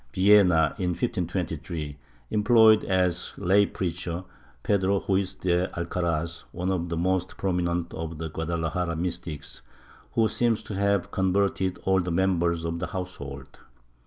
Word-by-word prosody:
Villena, 95 Hz, -4 st, +5 dB
in 90 Hz, -2 st, 0 dB
1523, 85 Hz, -, -3 dB, 0.4 s
employed 110 Hz, 0 st, +5 dB
as 90 Hz, -2 st, 0 dB
lay 100 Hz, +2 st, +4 dB
preacher 85 Hz, -1 st, -3 dB, 0.4 s
Pedro 100 Hz, -1 st, +2 dB
Ruiz 95 Hz, -1 st, +1 dB
de 90 Hz, -1 st, +1 dB
Alcaraz, 85 Hz, -1 st, -2 dB
one 90 Hz, +2 st, -2 dB
of 85 Hz, -2 st, -1 dB
the 85 Hz, -, -2 dB
most 95 Hz, +1 st, 0 dB
prominent 90 Hz, -2 st, -1 dB
of 80 Hz, 0 st, -5 dB
the 80 Hz, 0 st, -5 dB
Guadalajara 85 Hz, +1 st, -2 dB
mystics, 85 Hz, -3 st, -5 dB, 0.5 s
who 115 Hz, -1 st, +3 dB
seems 115 Hz, -1 st, 0 dB
to -, -, -7 dB
have 100 Hz, -1 st, +1 dB
con 95 Hz, -1 st, +1 dB
verted 95 Hz, -1 st, +1 dB
all 95 Hz, 0 st, +3 dB
the 90 Hz, -, -3 dB
members 85 Hz, -2 st, +1 dB
of 85 Hz, 0 st, -2 dB
the 90 Hz, -, -3 dB
household. 70 Hz, -7 st, -7 dB
90 Hz, 135 wpm, -26 LUFS, 85-95 Hz, 0.5 s, Villena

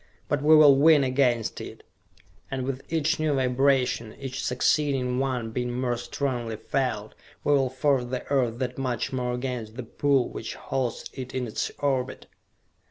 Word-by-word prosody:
But 145 Hz, -1 st, 0 dB
we 155 Hz, +2 st, +6 dB
will 145 Hz, -3 st, +8 dB
win 150 Hz, 0 st, +6 dB
against 130 Hz, -3 st, +1 dB
it, -, -, -9 dB, 0.7 s
and 135 Hz, -1 st, -3 dB
with 135 Hz, 0 st, -3 dB
each 160 Hz, +1 st, +1 dB
new 155 Hz, -2 st, +1 dB
vibration, 130 Hz, -3 st, +1 dB
each 135 Hz, -1 st, -5 dB
succeeding 125 Hz, -1 st, +1 dB
one 125 Hz, -4 st, -1 dB
being 125 Hz, +1 st, -2 dB
more 125 Hz, -2 st, 0 dB
strongly 120 Hz, -1 st, -3 dB
felt, 110 Hz, -2 st, -2 dB, 0.3 s
we 145 Hz, -, +3 dB
will 135 Hz, -2 st, +3 dB
force 130 Hz, 0 st, +1 dB
the 125 Hz, +1 st, -4 dB
Earth 125 Hz, -4 st, +1 dB
that 125 Hz, +1 st, -3 dB
much 125 Hz, -2 st, -2 dB
more 125 Hz, -1 st, -1 dB
against 125 Hz, -3 st, -4 dB
the 130 Hz, -, -5 dB
pull 135 Hz, +2 st, +1 dB
which -, -, -6 dB
holds 130 Hz, -3 st, -3 dB
it 130 Hz, -1 st, -7 dB
in 130 Hz, -1 st, -1 dB
its 110 Hz, -, -2 dB
orbit!" 130 Hz, -3 st, -1 dB
130 Hz, 165 wpm, -26 LUFS, 125-140 Hz, 0.7 s, will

